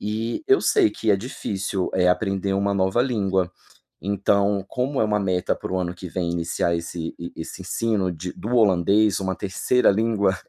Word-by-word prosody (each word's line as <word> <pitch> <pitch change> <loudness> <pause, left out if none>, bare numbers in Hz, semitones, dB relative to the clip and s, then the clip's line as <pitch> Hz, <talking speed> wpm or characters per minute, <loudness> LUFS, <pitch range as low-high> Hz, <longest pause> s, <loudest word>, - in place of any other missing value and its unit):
E 110 - -3
eu 395 0 +5
sei 385 -6 +3
que 110 - -1
é 100 - +5
difícil, 95 -4 -3
eh, 90 -1 +3
aprender 95 +1 0
uma 100 +1 +1
nova 95 +5 +2
língua. 95 -8 0 0.5
Então, 100 0 +1
como 130 +2 -1
é - - +4
uma 105 -1 +1
meta 95 -2 0
para - - -6
o 95 - 0
ano 90 -1 -2
que 90 +1 -8
vem 85 0 -2
iniciar 85 0 0
esse 85 0 -5 0.2
esse 80 - -7
ensino 105 -5 0
de 90 +2 -6
do 110 - -7
holandês, 100 -1 +3
uma 95 -1 -2
3º 105 +6 +1
língua, 100 -2 +1
100 Hz, 175 wpm, -23 LUFS, 90-110 Hz, 0.5 s, eu